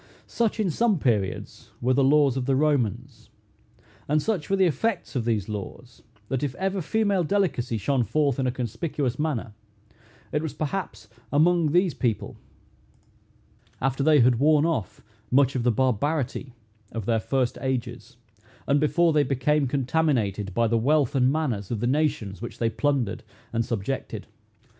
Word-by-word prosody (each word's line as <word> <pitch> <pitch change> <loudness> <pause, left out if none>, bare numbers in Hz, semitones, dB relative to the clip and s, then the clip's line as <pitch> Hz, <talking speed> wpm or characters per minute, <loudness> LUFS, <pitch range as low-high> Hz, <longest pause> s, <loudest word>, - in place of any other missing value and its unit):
Such, 230 -2 -1
in 200 -5 +1
some 225 +3 +2
periods, 105 - -2
were 125 +2 +1
the 135 - +3
laws 140 -1 +4
of 130 -1 -2
the 135 - +3
Romans; 125 -4 -1 0.8
and 150 +2 +2
such 185 -3 -2
were 195 - +3
the 190 -1 +4
effects 180 - -1
of 120 -3 -1
these 110 -5 0
laws, 110 +3 -7 0.3
that 135 +2 -2
if 140 -3 -2
ever 190 0 -1
female 200 +1 +1
delicacy 165 - 0
shone 125 +5 +1
forth 140 +2 0
in 130 - +1
a - - +1
conspicuous 130 +2 -3
manner, 130 -8 -2 0.8
it 150 - 0
was 160 -2 -5
perhaps 170 +6 -4 0.2
among 160 +1 +3
those 175 0 +3
people, 120 -4 -2 1.4
after 135 +1 -1
they 150 -1 +5
had 120 -1 +4
worn 150 +1 +4
off 160 - -2 0.3
much 135 0 +4
of 130 - 0
the 120 +1 +3
barbarity 130 +2 -1 0.4
of 115 -3 -5
their 115 0 +2
first 130 +1 -1
ages, 125 -1 -4 0.5
and 140 +1 +2
before 165 +2 +3
they 150 - +4
became 140 +1 +1
contaminated, 125 - 0
by 115 - +3
the 115 0 +2
wealth 145 +2 +2
and 130 -1 +3
manners 125 -11 -2
of 115 - -2
the 120 - -1
nations 125 -8 0
which 120 - -7
they 115 -1 0
plundered 135 -8 0 0.3
and 115 0 +1
subjected. 115 +4 -4
135 Hz, 160 wpm, -25 LUFS, 120-155 Hz, 1.4 s, they